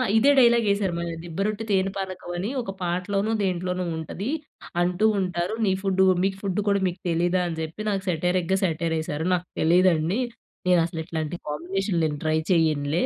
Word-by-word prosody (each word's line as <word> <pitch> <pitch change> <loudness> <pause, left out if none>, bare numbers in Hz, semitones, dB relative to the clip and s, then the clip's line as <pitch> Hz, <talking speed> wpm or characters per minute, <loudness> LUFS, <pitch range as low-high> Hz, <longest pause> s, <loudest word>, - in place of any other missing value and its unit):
ఇదే 270 +6 +6
డైలాగేసారు 210 -6 +3
మళ్ళా 170 0 -3
దిబ్బరొట్టె 200 +6 -2
తేనె 195 -1 +2
పానకమనీ 185 0 -4
ఒక 215 -5 -5
పాటలోనో, 195 +4 -1
దేంట్లోనో 180 0 -1
ఉంటది 185 - -5 0.5
అంటూ 180 +4 +1
ఉంటారు. 180 +1 -1
నీ 190 - +3
ఫుడ్డు 190 -1 +3 0.2
మీకు 195 0 0
ఫుడ్డు 195 0 -1
కూడా 200 0 +3
మీకు 180 - -4
తెలీదా? 175 +2 +2
అని 165 -2 -4
చెప్పి 160 +6 -5
నాకు 195 -2 -1
సేటైరిగ్గ 180 +2 +1
సటైరేశారు. 160 -2 -1
నాకు 180 0 -1
తెలీదండి! 175 +3 +3 0.5
నేను 180 -1 +5
అసలు 165 -1 -5
ఇట్లాంటి 160 -1 -3
కాంబినేషన్‌లు 175 +3 -1
నేను 150 -2 -2
ట్రై 155 0 +2
చేయనులే 155 -1 +2
180 Hz, 150 wpm, -25 LUFS, 165-195 Hz, 0.5 s, ఇదే